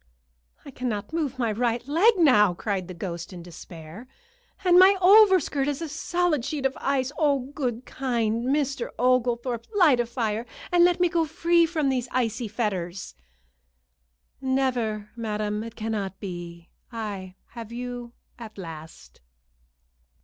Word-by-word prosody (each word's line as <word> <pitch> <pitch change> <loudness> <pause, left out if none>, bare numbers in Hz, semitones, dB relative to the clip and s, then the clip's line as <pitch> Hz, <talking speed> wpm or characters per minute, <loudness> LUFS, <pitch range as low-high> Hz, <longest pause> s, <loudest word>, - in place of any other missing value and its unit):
"I 280 - -9
cannot 245 -1 -4
move 295 -6 -2
my 235 -3 0
right 235 +2 -1
leg 380 +10 +4
now," 210 - +5
cried 190 -1 -3
the 185 - -8
ghost, 170 -1 -6
in 175 -2 -9
despair, 170 +4 -11 0.6
"and 360 0 +7
my 385 +2 +7
overskirt 375 -8 +5
is 290 -2 -1
a 330 - -4
solid 335 -1 0
sheet 280 +1 -3
of 270 - +1
ice. 270 -1 0
Oh, 280 -4 +1
good, 250 -4 -3
kind 235 -3 -1
Mr. 275 -2 0
Oglethorpe, 245 -1 +1
light 315 -11 +5
a 240 - 0
fire, 230 -1 -2 0.2
and 350 -1 +5
let 355 0 +3
me 355 - +4
go 335 -1 +1
free 335 +1 +2
from 310 -4 0
these 255 -2 -1
icy 235 -1 -1
fetters." 195 -5 -3 1.3
"Never, 245 -6 -1
madam. 210 -2 -2
It 230 0 -9
cannot 210 -4 -4
be. 175 -3 -8 0.2
I 200 -5 -6
have 230 -2 -9
you 245 0 -6 0.3
at 220 -3 -10
last." 160 - -10
240 Hz, 140 wpm, -25 LUFS, 210-285 Hz, 1.3 s, and